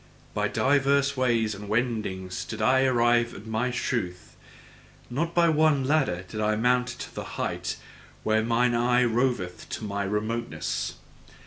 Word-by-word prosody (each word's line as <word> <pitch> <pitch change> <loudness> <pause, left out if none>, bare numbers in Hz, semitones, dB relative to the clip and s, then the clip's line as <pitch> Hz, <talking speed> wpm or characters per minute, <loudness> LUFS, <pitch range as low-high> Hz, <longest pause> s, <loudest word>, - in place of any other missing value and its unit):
By - - 0
divers 140 0 +2
ways 115 -4 +1
and 100 +1 -8
wendings 105 -5 -2
did 110 - -7
I 130 +4 +4
arrive 120 -2 +3
at 105 - -10
my 110 +3 -1
truth; 95 -7 -3 0.8
not 165 +7 -2
by 170 -1 +5
one 155 -3 +3
ladder 135 - +1
did 110 - -5
I 105 0 +2
mount 125 +2 +2
to 125 - -7
the - - -5
height - - -2 0.5
where 110 0 +2
mine 120 +2 +2
eye 120 +1 +3
roveth 120 -6 0
into - - -5
my 100 -1 -2
remoteness. 110 +4 -2
120 Hz, 145 wpm, -26 LUFS, 110-130 Hz, 0.8 s, by